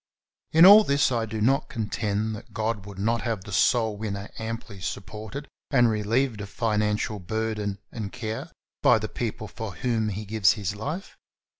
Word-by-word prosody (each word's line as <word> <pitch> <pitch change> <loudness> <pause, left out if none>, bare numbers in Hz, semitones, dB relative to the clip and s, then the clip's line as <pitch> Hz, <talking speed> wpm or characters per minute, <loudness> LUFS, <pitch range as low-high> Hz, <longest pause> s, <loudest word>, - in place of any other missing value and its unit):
In 165 +2 +8
all 205 +3 +10
this 140 -5 +2
I 115 -2 0
do 110 0 -4
not 135 +6 +2
contend 110 -1 -2
that 105 - -12
God 110 -2 -2
would 100 -2 -9
not 115 +4 +1
have 115 -5 -2
the 100 - -9
soul 110 +1 +3
winner 100 -1 -5
amply 110 -2 -5
supported 110 +10 -6 0.2
and 120 -5 +4
relieved 110 +2 0
of 100 - -7
financial 105 0 0
burden 105 +1 -2
and 105 -4 -5
care 120 +6 -5 0.3
by 120 - +6
the 110 0 -3
people 110 -1 -4
for 105 -3 -7
whom 115 -4 0
he 105 +1 -5
gives 105 -3 +3
his 100 -2 -3
life. 155 - -5
110 Hz, 170 wpm, -26 LUFS, 105-120 Hz, 0.3 s, all